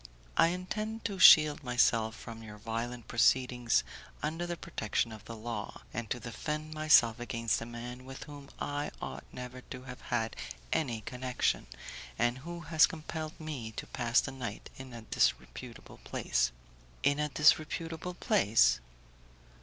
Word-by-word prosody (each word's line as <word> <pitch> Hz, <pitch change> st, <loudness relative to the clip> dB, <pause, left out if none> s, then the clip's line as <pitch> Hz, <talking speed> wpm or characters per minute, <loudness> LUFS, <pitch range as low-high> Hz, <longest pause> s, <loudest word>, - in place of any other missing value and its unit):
"I 165 Hz, -, +6 dB
intend 215 Hz, +5 st, -3 dB
to 200 Hz, -3 st, -2 dB
shield 155 Hz, -2 st, +8 dB
myself 115 Hz, -3 st, +2 dB
from 115 Hz, -2 st, -9 dB
your 105 Hz, -1 st, -10 dB
violent 115 Hz, +2 st, -4 dB
proceedings 125 Hz, -, +3 dB, 0.4 s
under 165 Hz, +3 st, -2 dB
the 175 Hz, 0 st, -3 dB
protection 115 Hz, -2 st, -1 dB
of 110 Hz, -1 st, -10 dB
the 115 Hz, -, -7 dB
law, 115 Hz, +1 st, -5 dB
and 120 Hz, -1 st, -4 dB
to 120 Hz, -, -1 dB
defend 150 Hz, +7 st, -4 dB
myself 150 Hz, -7 st, +5 dB
against 115 Hz, -2 st, -1 dB
a 115 Hz, -, -5 dB
man 120 Hz, +1 st, -7 dB
with 135 Hz, +1 st, -8 dB
whom 145 Hz, -1 st, -11 dB
I 145 Hz, 0 st, -2 dB
ought -, -, -6 dB
never 125 Hz, 0 st, -7 dB
to 130 Hz, 0 st, -9 dB
have 125 Hz, -1 st, -9 dB
had 115 Hz, -2 st, -1 dB, 0.4 s
any 120 Hz, -8 st, 0 dB
connection, 125 Hz, +3 st, -1 dB, 0.5 s
and 120 Hz, +2 st, +1 dB
who 170 Hz, +4 st, -7 dB
has 160 Hz, -1 st, +5 dB
compelled 155 Hz, 0 st, -6 dB
me 140 Hz, -8 st, -5 dB
to -, -, -5 dB
pass 120 Hz, -1 st, +2 dB
the 135 Hz, -, -5 dB
night 125 Hz, -6 st, -6 dB
in 130 Hz, -1 st, -9 dB
a 115 Hz, -2 st, -8 dB
disreputable -, -, -1 dB
place." -, -, 0 dB, 0.5 s
"In 145 Hz, +1 st, +3 dB
a 150 Hz, 0 st, 0 dB
disreputable 165 Hz, +3 st, +2 dB
place?" 100 Hz, -, +4 dB
125 Hz, 150 wpm, -32 LUFS, 115-155 Hz, 0.5 s, shield